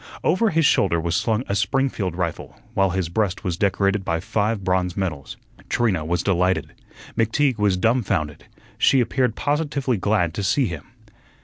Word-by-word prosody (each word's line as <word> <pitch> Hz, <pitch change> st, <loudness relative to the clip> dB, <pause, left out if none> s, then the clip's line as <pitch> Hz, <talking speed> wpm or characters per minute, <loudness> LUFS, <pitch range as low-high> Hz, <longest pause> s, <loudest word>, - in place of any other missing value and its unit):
Over 220 Hz, +6 st, +2 dB
his 165 Hz, -3 st, +2 dB
shoulder 90 Hz, -10 st, +3 dB
was 85 Hz, +1 st, -1 dB
slung 110 Hz, +4 st, 0 dB
a -, -, -1 dB
Springfield 100 Hz, -, 0 dB
rifle, 85 Hz, -3 st, -4 dB, 0.2 s
while 95 Hz, -1 st, +2 dB
his 95 Hz, -1 st, -1 dB
breast 95 Hz, +2 st, -1 dB
was 90 Hz, -4 st, -1 dB
decorated 100 Hz, +1 st, +1 dB
by 85 Hz, -2 st, -1 dB
five 105 Hz, +3 st, -1 dB
bronze 90 Hz, -1 st, 0 dB
medals. 75 Hz, -8 st, -4 dB, 0.3 s
Trina 105 Hz, -9 st, +1 dB
was 85 Hz, +3 st, -1 dB
delighted. 95 Hz, -1 st, +1 dB, 0.4 s
McTeague 115 Hz, +2 st, +1 dB
was 100 Hz, -3 st, +2 dB
dumfounded. 95 Hz, -, 0 dB, 0.3 s
She 135 Hz, -, +4 dB
appeared 125 Hz, -1 st, +1 dB
positively 145 Hz, -4 st, -1 dB
glad 95 Hz, -4 st, +1 dB
to 100 Hz, -, -3 dB
see 125 Hz, +8 st, +2 dB
him. 85 Hz, -8 st, -5 dB
100 Hz, 155 wpm, -22 LUFS, 90-120 Hz, 0.4 s, She